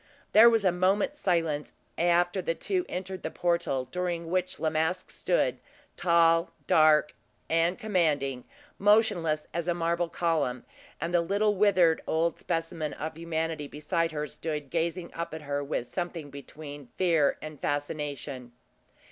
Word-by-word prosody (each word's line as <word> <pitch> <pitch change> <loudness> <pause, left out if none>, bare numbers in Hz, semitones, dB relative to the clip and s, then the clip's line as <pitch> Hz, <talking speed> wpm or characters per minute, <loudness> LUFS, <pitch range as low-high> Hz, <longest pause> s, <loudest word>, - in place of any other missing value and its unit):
There 225 +2 +9
was 225 -3 +2
a 185 - +5
moment's 195 +10 +1
silence 165 -5 0 0.2
after 175 +2 +2
the 165 -1 -1
two 370 - -1
entered 185 0 -5
the - - -3
portal, 170 -7 0
during 175 -2 -3
which 185 0 -1
La 155 - 0
Masque 160 +4 -1
stood, - - 0 0.4
tall, 170 -1 +3 0.2
dark, 155 -1 +4 0.3
and 165 +2 +2
commanding, 150 - 0 0.4
motionless 200 -7 +3
as 170 +1 -2
a 175 - +1
marble 170 0 0
column; 160 -9 -1 0.3
and 165 +3 -3
the 175 - +4
little 205 +4 +1
withered 185 -5 +4
old 165 +1 0
specimen 165 -3 -3
of 155 +1 -5
humanity 160 -2 -3
beside 165 +3 -1
her 150 -1 -3
stood 150 -1 -4
gazing 170 +1 -2
up 170 -1 -4
at 160 - -8
her 145 0 -2
with 140 -3 -2
something 170 -2 -5
between 145 0 -9
fear 165 -6 +3
and 155 -2 -8
fascination. 145 -4 -4
165 Hz, 145 wpm, -28 LUFS, 150-180 Hz, 0.4 s, There